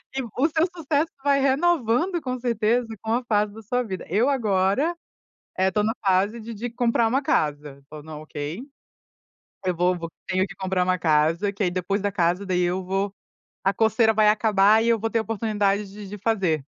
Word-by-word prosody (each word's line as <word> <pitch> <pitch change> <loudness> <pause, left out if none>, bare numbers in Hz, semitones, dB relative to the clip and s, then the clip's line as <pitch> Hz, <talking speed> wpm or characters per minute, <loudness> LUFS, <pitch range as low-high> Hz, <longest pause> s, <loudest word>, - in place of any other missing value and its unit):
e 270 - 0 0.2
o 300 +5 +3
seu 315 +1 +2
sucesso 315 -1 0
vai 280 -1 +3
renovando 305 - +2
com 255 -1 -4
certeza 235 0 +1 0.2
com 220 +1 -1
a 245 +1 0
fase 210 -2 +1
da 225 - -10
sua 245 +4 -1
vida. 190 -6 -6
Eu 220 +9 +2
agora, 220 - +1 0.6
eh, 190 0 +3
estou 210 +2 0
na 220 +2 +1
fase 195 +4 +2
de 230 +1 -7
de 240 +4 -4
comprar 235 -1 +1
uma 265 +5 +1
casa 145 - -1
o 155 - -8
na 155 0 -9
ok. 155 +4 -6 1.0
Eu 180 -1 0
vou 180 +1 +1
vou 165 -1 -6 0.2
tenho 185 +1 +1
que 205 +1 -11
comprar 190 -1 0
uma 185 0 0
casa, 165 +5 +2
que 200 - -2
aí 180 - +1
depois 185 +3 -1
da 205 0 -1
casa, 180 +1 0
daí 180 -1 0
eu 180 +2 -1
vou 195 +2 -2 0.5
a 195 0 +2
coceira 220 +1 +3
vai 215 0 +4
acabar 210 0 +4
e - - +1
eu 230 -1 +3
vou 225 +1 -1
ter 230 - +1
a - - 0
oportunidade 210 -2 -1
de 205 0 -10
de 210 +2 -8
fazer. 190 -9 0
210 Hz, 205 wpm, -24 LUFS, 185-235 Hz, 1.0 s, vai